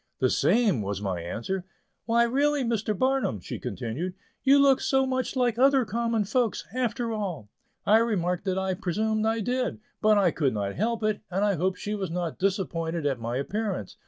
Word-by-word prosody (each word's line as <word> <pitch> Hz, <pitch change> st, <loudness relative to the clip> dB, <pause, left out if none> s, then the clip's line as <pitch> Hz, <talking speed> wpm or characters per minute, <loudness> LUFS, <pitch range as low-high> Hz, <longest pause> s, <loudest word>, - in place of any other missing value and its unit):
"The 130 Hz, -1 st, +2 dB
same," 205 Hz, -, +3 dB
was 100 Hz, -1 st, -3 dB
my 95 Hz, -4 st, -3 dB
answer. 120 Hz, -, -3 dB, 0.4 s
"Why, 235 Hz, +1 st, +4 dB
really, 280 Hz, +4 st, +2 dB
Mr. 220 Hz, -3 st, -1 dB
Barnum," 260 Hz, -, +1 dB
she -, -, -6 dB
continued, 160 Hz, +11 st, -4 dB, 0.3 s
"you 275 Hz, +1 st, +5 dB
look 275 Hz, -2 st, +5 dB, 0.3 s
much 260 Hz, 0 st, -1 dB
like 245 Hz, -3 st, +1 dB
other 270 Hz, -1 st, +5 dB
common 230 Hz, 0 st, 0 dB
folks, 230 Hz, +2 st, 0 dB
after 240 Hz, -2 st, -1 dB
all." 185 Hz, -, -4 dB, 0.4 s
I 210 Hz, +2 st, +6 dB
remarked 180 Hz, -5 st, 0 dB
that 190 Hz, -1 st, 0 dB
I 190 Hz, 0 st, 0 dB
presumed 215 Hz, +5 st, 0 dB
I 225 Hz, 0 st, +1 dB
did; 250 Hz, +3 st, -1 dB, 0.2 s
but 215 Hz, -1 st, +5 dB
I 190 Hz, -4 st, +4 dB
could 140 Hz, -8 st, 0 dB
not 100 Hz, -1 st, -2 dB
help 225 Hz, +2 st, -1 dB
it, 215 Hz, -1 st, 0 dB
and 195 Hz, +3 st, 0 dB
I 205 Hz, -, +2 dB
hoped 185 Hz, +2 st, 0 dB
she 210 Hz, -, -4 dB
was 195 Hz, -4 st, -3 dB
not 170 Hz, -1 st, -3 dB
disappointed 170 Hz, -4 st, -1 dB
at 135 Hz, -4 st, 0 dB
my 115 Hz, +2 st, -3 dB
appearance. 195 Hz, -, -3 dB
205 Hz, 185 wpm, -27 LUFS, 170-235 Hz, 0.4 s, I